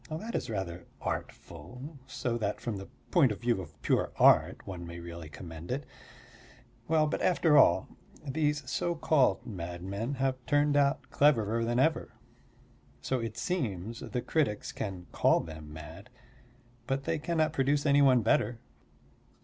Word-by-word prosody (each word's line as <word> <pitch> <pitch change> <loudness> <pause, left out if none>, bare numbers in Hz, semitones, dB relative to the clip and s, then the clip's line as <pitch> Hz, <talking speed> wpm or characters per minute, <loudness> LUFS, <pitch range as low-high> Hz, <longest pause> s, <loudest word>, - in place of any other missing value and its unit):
That 190 +9 -5
is - - -2
rather 90 -5 -4
artful; 125 - -6
so 120 -1 -2
that 110 - -2
from 115 -4 -3
the 95 - -8 0.2
point 145 - +5
of 105 - -5
view 120 -5 +1
of 80 -5 -12
pure - - +1
art - - +4
one 90 -3 -6
may 85 +1 -7
really 85 -2 -8
commend 80 +2 -9
it. 135 +2 -2 1.0
Well, 155 -1 +3
but 150 - -2
after 165 -4 +3
all, 95 -10 +6 0.4
these 150 -1 -1
so 175 +5 -1
called 140 - +2
madmen 95 +6 -4
have 130 -1 -1
turned 145 0 +3
out 140 -1 +1
cleverer 115 -6 +3
than 120 +1 0
ever. 155 +1 +1 0.9
So 130 - 0
it 115 -1 -5
seems 115 - -2
the 125 - -4
critics 140 -10 0
can 95 -4 -5
call - - +3
them 80 -2 -8
mad, 80 +8 -10 0.8
but 135 +1 -1
they 150 - -1
cannot 155 0 0
produce 140 0 +1
any 145 0 +5
one 130 -4 +5
better. 115 +2 +2
120 Hz, 150 wpm, -30 LUFS, 95-145 Hz, 1.0 s, all